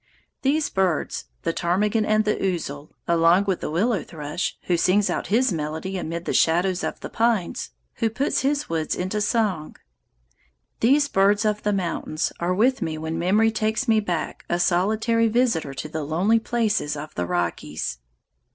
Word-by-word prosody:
These 290 +3 +2
birds, 185 -5 0 0.2
the 165 - 0
ptarmigan 205 +6 +1
and 215 0 +3
the 210 - +2
ouzel, 155 -6 -3 0.2
along 170 +3 +4
with 190 -3 -1
the - - -3
willow 200 +6 +1
thrush, 150 +2 -4
who 180 - +1
sings 190 +4 +2
out - - -2
his 230 +1 +2
melody 160 +4 -3
amid 170 -1 -4
the - - -1
shadows 175 +3 +2
of - - -3
the - - -6
pines, 225 -6 0 0.3
who 225 - +1
puts 265 +6 0
his 285 +2 0
woods 160 -1 -1
into 185 +4 -2
song, 205 -7 0 1.0
these 280 +5 +4
birds 205 -1 +3
of 210 0 +1
the 210 - 0
mountains 170 -4 -2
are 175 +2 0
with 255 +6 +2
me 155 -1 -2
when 160 +1 -3
memory 210 +6 +3
takes 220 +4 -1
me 220 -1 +4
back 180 -6 -3
a 175 - 0
solitary 220 +6 +2
visitor 220 - +1
to 135 - -5
the 155 +1 -4
lonely 180 +10 +2
places 220 -10 0
of 150 +1 -7
the 90 0 -2
Rockies. 80 -7 -2
190 Hz, 170 wpm, -24 LUFS, 165-220 Hz, 1.0 s, along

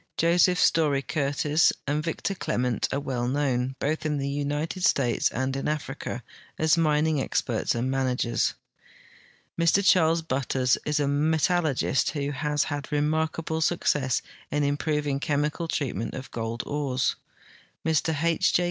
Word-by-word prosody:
Joseph 175 +2 +4
Story 145 -4 +3
Curtis, 145 +2 +2
and 150 +2 -1
Victor 170 +4 -2
Clement 125 - -1
are 140 - 0
well 130 -4 -2
known, 130 -1 0
both 155 +3 -1
in 150 -1 -1
the 140 0 -2
United 145 +5 -2
States 125 -8 +2
and 130 +2 -2
in 135 - -2
Africa, 145 -4 -4 0.3
as 160 -1 +3
mining 155 -2 +2
experts - - -1
and 125 +3 -1
managers; 125 -3 0 1.0
Mr 175 +4 +3
Charles 165 -2 +4
Butters 130 -3 +1
is 150 0 +1
a 145 - +1
metal 160 +5 +2
lurgist 135 -2 +1
who 145 -2 -2
has 150 +1 0
had 145 -2 -5
remarkable 160 +2 0
success 145 -6 +1 0.3
in 150 0 0
improving 145 0 0
the 140 - -5
chem 145 -1 +2
ical 160 +2 -3
treatment 115 -8 -2
of 130 - -8
gold 115 0 -3
ores; 140 -3 -1 0.7
Mr 160 -1 +1
H. 170 +1 +3
145 Hz, 145 wpm, -26 LUFS, 135-160 Hz, 1.0 s, Joseph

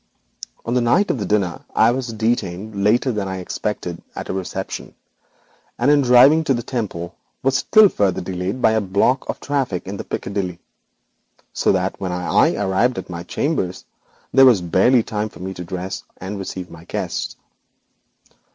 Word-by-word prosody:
On 115 - -1
the 125 - +2
night 125 +13 +3
of 130 - -3
the 100 - -3
dinner 100 -5 0
I 110 +2 +5
was 130 0 -2
detained 105 -3 -2
later 120 +5 +3
than 105 -4 -2
I 95 0 -4
expected 90 -1 -4
at - - -6
a - - -1
reception, 95 -1 -5 0.8
and 125 +4 +3
in 145 -1 +5
driving 135 +5 +6
to 135 - +2
the 120 - -3
Temple 95 -9 -4 0.3
was 135 +1 +3
still 215 -1 +6
further 100 - 0
delayed 95 +6 -4
by 110 - +6
a 110 0 +2
block 100 +7 +1
of - - -3
traffic 135 -10 -2
in 100 +1 -6
Piccadilly, 95 -3 -3 1.0
so - - +2
that - - -1
when 95 -2 -2
I 90 -3 +2
arrived 100 +5 +1
at - - -6
my 85 -1 -5
chambers 95 - -2 0.5
there 135 0 +8
was 120 -6 +6
barely 95 +8 +3
time 105 0 -3
for - - -15
me 95 +1 -5
to 90 - -7
dress 95 +1 -5 0.2
and 100 +2 -6
receive 95 -1 -6
my 80 -1 -12
guests. - - -3
105 Hz, 170 wpm, -21 LUFS, 95-125 Hz, 1.0 s, there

